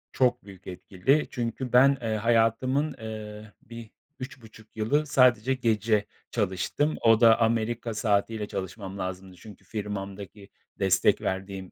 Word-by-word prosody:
Çok 125 -2 +1
büyük 100 -1 -14
etkili. 95 +10 0
Çünkü 120 +1 -4
ben, 135 +3 +6
ııı, 110 -1 -1
hayatımın, 120 +6 +1
ııı, 110 -1 -8
bir, 115 -1 -11 0.3
3,5 115 -4 -11
yılı 140 +8 +1
sadece 125 -3 +3
gece 110 -4 +1 0.3
çalıştım. 105 - -1
O 115 -1 +4
da 115 -1 +6
Amerika 115 +1 0
saatiyle 105 0 0
çalışmam 95 0 -6
lazımdı. 95 0 -6
Çünkü 100 +1 -14
firmamdaki 100 -1 -7 0.3
destek 95 -2 +3
verdiğim 95 0 -4
110 Hz, 125 wpm, -27 LUFS, 100-120 Hz, 0.3 s, ben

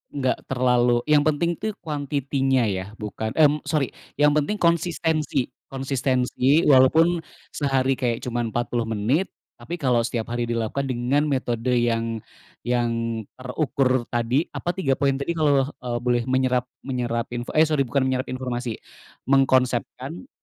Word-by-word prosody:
nggak 130 -2 -1
terlalu 125 -2 +2
yang 145 -1 +5
penting 160 +3 +1
tuh 220 - -2
quantity-nya 140 -4 0
ya 95 0 -3
bukan 110 +1 -5
mmm, 150 -1 +4
sori 150 -5 0 0.2
yang 150 +1 +4
penting 150 +8 +1
konsistensi 160 -5 +1 0.2
konsistensi 135 +2 +1
walaupun 160 +6 +5 0.3
sehari 135 -2 0
kayak 120 -3 -1
cuman 120 -1 -2
40 120 0 -2
menit 115 - 0 0.3
tapi 160 +9 -5
kalau 130 -7 +1
setiap 115 -1 -4
hari 120 0 -1
dilakukan 115 +4 -2
dengan 130 +4 +1
metode 125 -4 -1
yang 115 -1 0 0.5
yang 115 -2 0 0.2
terukur 130 -1 0
tadi, 120 +6 +1
apa 175 - -2
3 135 -8 0
poin 140 -1 +2
tadi 140 +4 -2
kalau, 145 -4 +3 0.2
eee, 120 -1 -2
boleh 120 -1 +1
menyerap 130 -1 +2 0.2
menyerap 120 -3 -2
info 120 0 -4
eh, 155 - +6
sori 150 -3 +2
bukan 140 +2 +1
menyerap 130 0 -1
informasi, 125 -2 -3 0.6
mengkonsepkan 130 - +1
130 Hz, 140 wpm, -24 LUFS, 120-145 Hz, 0.6 s, eh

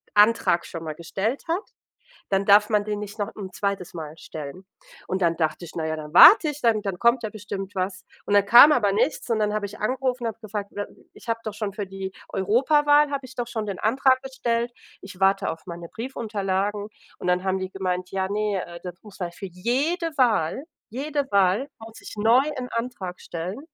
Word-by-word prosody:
Antrag 210 -4 +4
schon 165 -1 -7
mal 155 -1 -5
gestellt 195 - -3
hat, 335 +4 0 0.7
dann 195 0 +1
darf 205 +1 +6
man 210 -2 +2
den 210 -1 -2
nicht 210 0 -7
noch 205 - -3
'n 195 -3 -7
2. 195 -1 -3
Mal 155 -2 -7
stellen. 155 +3 -8 0.4
Und 190 +1 -2
dann 170 -1 +2
dachte 160 +1 -1
ich, 165 - -11
na 160 - -2
ja, 160 0 -1
dann 150 0 -8
warte 320 - +9
ich, 295 0 -6
dann 225 -3 +3
dann 195 -4 -3
kommt 235 +1 +3
ja 220 - -2
bestimmt 200 -2 -6
was. 185 0 -3 0.2
Und 205 - +1
dann 200 -1 +5
kam 240 +8 +9
aber 210 -9 +3
nichts, 245 +8 0
und 225 - +1
dann 210 0 +1
habe 210 -1 -1
ich 205 +1 -9
angerufen 255 +2 -1
und - - 0
habe 220 - -8
gefragt, 210 -2 -5
we 205 - -3
„Äh, - - -11 0.3
ich - - -16
habe 230 0 -1
doch 215 - -4
schon 205 -1 -3
für 205 -2 -4
die 190 0 -6 0.2
Europawahl 290 +8 +3
habe 275 -2 -3
ich 260 0 -13
doch 240 -1 -3
schon 220 -2 -3
den 200 -3 -5
Antrag 260 +3 +3
gestellt, 240 -3 -2 0.3
ich 190 -1 -11
warte 195 0 +3
auf 160 0 -7
meine 170 -1 -8
Briefunterlagen“ 205 -4 -3 0.3
und - - -6
dann 180 0 +2
haben 190 0 0
die 190 0 -5
gemeint: 185 -1 -3
„Ja, 190 -1 -1
ne, 205 -2 -1
äh, 170 0 -10
das 180 -2 -6
muss 210 -3 -14 0.2
für 195 - -7
jede 280 - -1
Wahl 235 - +2 0.3
jede 280 +3 -2
Wahl 200 +6 +3
muss 225 0 -12
ich - - -9
neu 225 +5 +5 0.2
'n 250 -1 -4
Antrag 230 -7 -4
stellen." 175 +7 -5
205 Hz, 215 wpm, -24 LUFS, 190-235 Hz, 0.7 s, warte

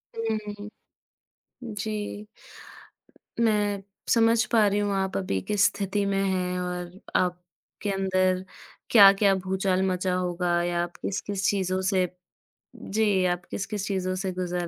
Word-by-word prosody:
हुँ, 225 -1 -1 0.2
हुँ। 205 +1 -7 0.9
जी। 210 -1 -4 1.1
मैं 205 -3 +1 0.3
समझ 230 -1 +4
पा 220 -3 +5
रही 200 +1 +1
हूँ 205 -1 0
आप 190 0 -1
अभी 185 - -1
किस 205 -1 +3
स्थिति 200 0 0
में 195 0 +1
हैं 180 -1 -1
और 180 -1 -4 0.2
आपके 180 +3 -3
अंदर 185 -1 +1 0.5
क्या-क्या 200 -2 +7
भूचाल 190 0 0
मचा 185 0 0
होगा 175 -1 0
या 175 0 0
आप 175 - -7
किस-किस 200 0 -3
चीज़ों 190 -2 0
से 190 -1 +2 0.7
जी, 205 -3 +1
आप 175 -1 -1
किस-किस 205 0 -3
चीज़ों 185 -2 -1
से 190 0 -2
गुज़र 180 -1 -3
190 Hz, 130 wpm, -26 LUFS, 180-205 Hz, 1.1 s, क्या-क्या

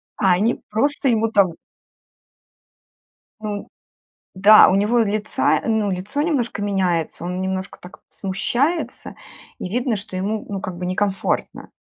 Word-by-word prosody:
А 190 -3 +2
они 215 +7 +1
просто 275 +6 +1
ему 225 -1 +2
там 195 -4 +4 1.9
Ну 210 -2 -5 0.7
да, 205 +3 +8
у 185 - +2
него 210 +5 +2
лица 215 -1 +1
ну, 220 -2 +1
лицо 195 +10 -3
немножко 250 -9 -1
меняется, 180 -5 -1
он 180 +1 -3
немножко 190 0 -4
так 180 - -13
смущается, 245 - -2 0.4
и 180 - -5
видно, 240 +2 0
что 200 -2 -7
ему, 205 +4 -2
ну, 195 -2 -4
как 185 -2 -6
бы 180 +1 -4
некомфортно. 195 +1 -2
205 Hz, 130 wpm, -21 LUFS, 185-225 Hz, 1.9 s, да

